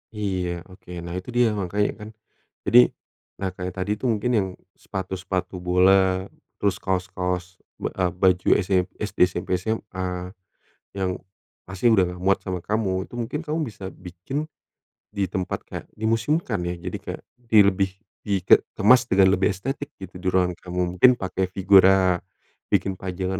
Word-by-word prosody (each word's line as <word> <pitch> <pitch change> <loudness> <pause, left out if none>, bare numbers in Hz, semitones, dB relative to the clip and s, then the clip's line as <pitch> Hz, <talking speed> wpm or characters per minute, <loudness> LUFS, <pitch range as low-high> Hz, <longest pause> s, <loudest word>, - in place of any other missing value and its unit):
Iya 90 -4 -2
oke. 95 -1 -17
Nah 85 0 -6
itu 95 - -12
dia 120 -1 +5
makanya 105 0 0
kan. 105 0 -8 0.6
Jadi 120 - +7 0.6
nah 95 - -1
kayak 90 0 -5
tadi 95 +2 -2
tuh 130 - -1
mungkin 110 +3 -1
yang 95 -2 +1 0.3
sepatu-sepatu 95 -1 -4
bola, 95 +1 +4 0.3
terus 100 -2 +1
kaos-kaos 90 -1 -2 0.2
ba - - -1
eee, 90 -2 0
baju 95 -1 +3
ese 95 0 -2 0.3
SD, 105 - -5
SMP, 90 - -5
SMA 90 -4 -4 0.7
yang 95 -1 0 0.6
pasti 95 +4 -2
udah 95 -4 +5
enggak 90 0 -8
muat 100 +1 +4
sama 90 -2 -3
kamu, 100 -3 0
itu - - -15
mungkin 120 +6 -3
kamu 155 +1 -1
bisa 100 -3 -11
bikin 90 - -7 0.8
di 100 - -1
tempat 95 -2 -2
kayak - - -7
dimuseumkan 115 - 0
ya. 90 - -2
Jadi 90 - -3
kayak, - - -6 0.3
di 110 - +4
lebih 95 0 +2 0.4
di 100 -2 0
ke - - +7 0.2
kemas 120 +3 +5
dengan 95 0 +5
lebih 95 +1 +2
estetik 135 +8 -4
gitu 95 -1 -9
di 95 - -5
ruangan 90 -1 +2
kamu, 90 0 -3 0.2
mungkin 130 - +8
pakai 95 -1 -2
figura, 95 -1 +5 0.5
bikin 95 -1 +1
pajangan 95 0 -3
95 Hz, 155 wpm, -24 LUFS, 90-105 Hz, 0.8 s, mungkin